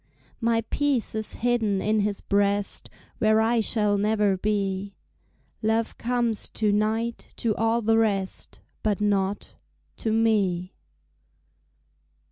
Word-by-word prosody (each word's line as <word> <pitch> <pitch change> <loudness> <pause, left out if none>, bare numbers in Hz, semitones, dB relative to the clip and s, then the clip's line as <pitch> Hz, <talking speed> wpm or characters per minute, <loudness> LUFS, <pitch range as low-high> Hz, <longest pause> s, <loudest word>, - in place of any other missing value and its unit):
My 230 -1 +2
peace 285 -5 0
is 220 0 -3
hidden 225 -5 +2
in 215 +2 +1
his 205 -1 -1
breast 200 0 0 0.3
Where 215 0 +4
I 230 +1 +3
shall 210 -2 +1
never 210 -1 +2
be; 195 0 -2 0.7
Love 225 +1 0
comes 235 -2 0
to 215 -1 0
night 220 +3 -1
to 220 -3 -1
all 225 +1 +1
the 225 +1 +3
rest, 200 -4 -1 0.2
But 210 -3 0
not 200 -1 0 0.4
to 220 - -1
me. 200 -5 +1
215 Hz, 115 wpm, -25 LUFS, 200-225 Hz, 0.7 s, Where